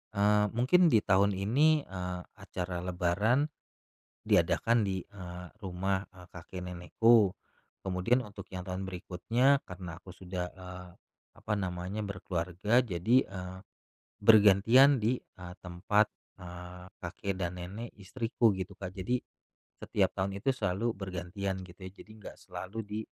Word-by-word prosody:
eee, 105 +1 +4
mungkin 170 +10 +5
ditahun 100 - +4
ini, 140 +10 +3
eee, 90 -1 -5 0.2
acara 90 0 -4
lebaran 90 - +1 0.7
diadakan 115 -2 +3
di, 95 -2 -1
eee, 90 -2 -9
rumah, 95 0 -2
eee, 90 -1 -14
kakek 90 +2 -9
nenekku. 95 +4 +3 0.5
Kemudian 95 +7 +1
untuk 100 -3 -10
yang 90 - -4
tahun 95 +1 -4
berikutnya, 115 +9 +1
karena 90 -2 -8
aku 90 0 -12
sudah, 90 0 -4
eee, 90 -1 -9 0.4
apa 105 - -4
namanya, 95 +2 -3
berkeluarga, 95 +4 0
jadi, 95 +3 +1
eee, 90 -1 -7 0.6
bergantian 110 +6 +7
di, 120 +2 0
eee, 90 -1 -11
tempat, 95 +4 +1 0.3
eee, 90 +1 -9
kakek 95 +2 -4
dan 90 -1 -2
nenek 105 +7 -7
istriku, 115 +3 +1
gitu 95 +1 -5
Kak. 95 -1 -6
Jadi 120 +7 -1 0.6
setiap - - +1
tahun 100 +1 -2
itu 135 - +1
selalu 110 -3 0
bergantian, 95 0 -4
gitu 90 -1 -12
ya. 95 - -7
Jadi 110 - -15
nggak 105 - -10
selalu 95 +4 -7
di 105 0 -5
95 Hz, 130 wpm, -31 LUFS, 90-110 Hz, 0.7 s, bergantian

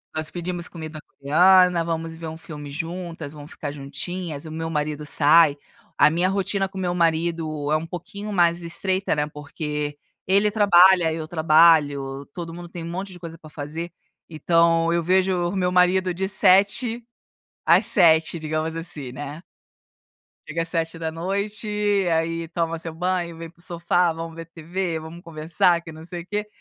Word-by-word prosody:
Nós 155 0 -2
pedimos 175 0 -3
comida 155 -2 -8
coreana, 180 +4 +4
vamos 165 0 -4
ver 165 0 -7
um 160 - -7
filme 150 -4 -8
juntas, 165 0 -6
vamos 150 0 -11
ficar 145 -2 -6
juntinhas, 145 +3 -5
o 155 - -8
meu 160 +1 -4
marido 150 -1 -3
sai, 150 0 +5 0.4
a - - +6
minha 175 +4 +1
rotina 195 0 0
com 190 0 -12
o - - -3
meu 175 -1 -1
marido 160 -3 0
é - - +4
um 160 - -5
pouquinho 200 +5 -7
mais 175 -2 +2
estreita, 190 +3 +1
né, 150 0 -1
porque 150 0 -5 0.3
ele 200 +3 +3
trabalha, 185 -5 +5
eu 160 -1 -5
trabalho, 155 -4 +3
todo 170 -2 -6
mundo 175 0 -9
tem 170 -1 -7
um 165 - -6
monte 190 +3 -5
de 180 - -9
coisa 165 -1 -9
para 155 -1 -14
fazer. 155 +4 -6 0.4
Então 165 +1 +2
eu 170 - +1
vejo 185 0 +1
o 200 - -5
meu 180 -1 0
marido 180 0 +3
de 190 +2 -2
7 205 +5 +3 0.6
às - - +5
7, 165 -3 +4
digamos 155 +1 -3
assim, 150 -6 -5
né. 145 +4 -7 1.0
Chega 165 +2 -3
às 165 - -2
19:00, 170 +6 -3 0.5
aí 165 0 -2
toma 165 -1 -2
seu 165 0 -6
banho, 175 0 -2
vem 165 0 -8
para 170 - -26
o - - -4
sofá, 175 -1 +1
vamos 165 0 -7
ver 165 0 -8
TV, 165 +1 -4
vamos 160 +2 -10
conversar, 165 +1 +1
que 165 -1 -10
não 160 0 -11
sei 175 -1 -7
o 180 - -15
quê, 210 0 -3
165 Hz, 175 wpm, -23 LUFS, 155-180 Hz, 1.0 s, a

